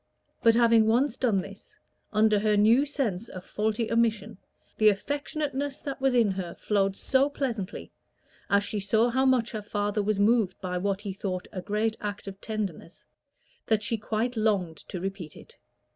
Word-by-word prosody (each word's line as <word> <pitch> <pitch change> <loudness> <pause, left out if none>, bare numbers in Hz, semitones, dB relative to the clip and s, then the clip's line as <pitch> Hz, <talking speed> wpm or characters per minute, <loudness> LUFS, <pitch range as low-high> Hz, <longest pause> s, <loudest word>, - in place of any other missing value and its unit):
But 230 -1 +5
having 230 -2 +5
once 240 +3 +2
done 225 -8 +1
this, 200 +1 -12 0.3
under 215 -1 +3
her 210 0 +2
new 230 +7 +5
sense 230 -8 -2
of 185 0 -9
faulty 220 +2 -1
omission, 225 -3 0 0.4
the 215 -1 +7
affectionateness 285 +4 -2
that 275 -1 -5
was 270 -1 +2
in 225 -4 +4
her 185 -3 -5
flowed 195 -2 0
so 270 +2 +2
pleasantly, 230 -9 -4 0.6
as 200 0 +3
she 210 0 -3
saw 220 +4 +2
how 260 +2 +2
much 250 -3 +2
her 215 - -4
father 205 0 -1
was 205 0 0
moved 210 -3 +2
by 180 -1 -3
what 200 +1 -1
he 200 -2 -5
thought 185 -2 -4
a 185 - -5
great 215 +3 -1
act 205 0 -5
of 195 0 -9
tenderness, 195 -7 -5 0.6
that 215 -1 +2
she 230 - 0
quite 225 +3 -2
longed 200 -7 0
to 180 - -4
repeat 190 -4 -6
it. - - -15
215 Hz, 175 wpm, -27 LUFS, 200-235 Hz, 0.6 s, the